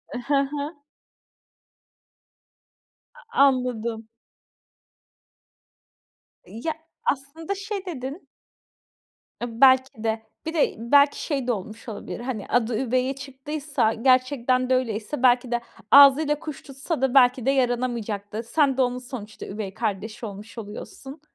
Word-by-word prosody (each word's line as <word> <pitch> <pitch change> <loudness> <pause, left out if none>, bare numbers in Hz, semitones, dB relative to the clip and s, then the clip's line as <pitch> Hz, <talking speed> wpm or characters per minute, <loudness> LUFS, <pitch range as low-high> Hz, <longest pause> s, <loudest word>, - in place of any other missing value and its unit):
I - - -2
hı 280 +4 0 0.2
hı. 295 +2 -4 2.6
A - - -2
anladım. 235 -4 0 2.4
Ya, 310 +9 -4 0.3
aslında 295 +7 -2
şey 395 -1 -5
dedin 285 0 -6 1.1
E 235 -1 -5
belki 260 -1 +7
de, 220 0 0 0.2
bir 320 - -3
de 310 - +2
belki 280 +5 +3
şey 275 -5 -2
de 245 - +3
olmuş 215 +3 -6
olabilir: 220 - -6
Hani, 240 -4 -4
adı 235 -2 +1
üveye 255 +1 0
çıktıysa, 275 -2 -2
gerçekten 255 +1 +2
de 255 - +4
öyleyse, 240 +2 -2
belki 245 0 +4
de 240 - 0 0.3
ağzıyla 285 +2 +7
kuş 310 -3 -7
tutsa 275 +2 -5
da 265 -2 +1
belki 250 -2 +5
de 270 - +4
yaranamayacak 240 -5 -1
da 220 +2 -3
sen 270 +2 +1
de - - +3
onun 250 0 +1
sonuçta 245 -4 -8
üvey 195 -1 -6
kardeşi 220 +1 -3
olmuş 210 +2 -9
oluyorsun. 235 +6 -9
255 Hz, 125 wpm, -24 LUFS, 230-280 Hz, 2.6 s, belki